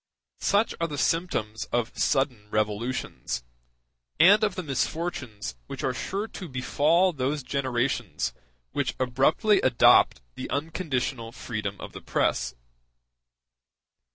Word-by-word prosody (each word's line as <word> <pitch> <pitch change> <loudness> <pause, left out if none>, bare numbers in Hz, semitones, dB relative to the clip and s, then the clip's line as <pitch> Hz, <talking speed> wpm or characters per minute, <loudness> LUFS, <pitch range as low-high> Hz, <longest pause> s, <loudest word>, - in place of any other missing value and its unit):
Such 205 +3 +2
are 165 - +2
the 145 -3 -5
symptoms 140 -10 0
of 120 0 -2
sudden 125 -7 0
revolutions, 105 - -2 0.8
and 205 +4 +7
of 210 - +1
the 185 - -3
misfortunes 135 - -3
which - - -6
are - - +1
sure 200 +3 -3
to 185 -5 -8
befall 155 +8 +2
those 140 +1 -1
generations 120 - -1 0.4
which - - -1
abruptly 135 - +3
adopt 115 - +5
the - - -6
unconditional 140 -6 -2
freedom 105 -5 -5
of - - -8
the - - -8
press. 60 0 0
130 Hz, 115 wpm, -27 LUFS, 115-165 Hz, 0.8 s, and